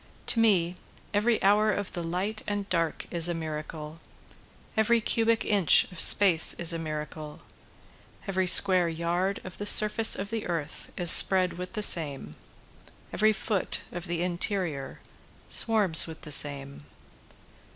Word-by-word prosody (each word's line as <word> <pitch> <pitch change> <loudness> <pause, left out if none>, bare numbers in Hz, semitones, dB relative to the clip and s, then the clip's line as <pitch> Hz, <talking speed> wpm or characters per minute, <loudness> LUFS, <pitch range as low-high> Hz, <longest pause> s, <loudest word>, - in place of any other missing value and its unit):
To 230 - -4
me 180 -6 0 0.4
every 215 +2 -1
hour 210 +2 +1
of 205 -1 -6
the 175 - -7
light 185 +6 -5
and 205 -1 -5
dark 165 -2 -4
is 170 -1 +2
a 175 - -4
miracle, 155 0 -9 0.8
Every 225 +2 0
cubic 225 +1 -1
inch 200 -7 +3
of 180 - -1
space 180 -6 +4
is 170 0 0
a 165 - -6
miracle, 155 -1 -9 0.9
Every 190 -1 -3
square 185 -2 +5
yard 175 +4 -4
of 185 - -13
the 205 - -5
surface 215 +2 +4
of 200 +2 -8
the 225 -1 -6
earth 165 -4 -7
is 175 -2 +4
spread 185 -2 +6
with 180 +3 -10
the 210 -2 -4
same, 145 - +2 0.8
Every 215 +2 +1
foot 210 -2 -2
of 175 +1 -9
the 170 0 -5
interior 175 -5 -5 0.5
swarms 205 -9 +3
with 160 -1 -12
the 150 - -11
same. 140 -1 -2
180 Hz, 145 wpm, -25 LUFS, 165-205 Hz, 0.9 s, spread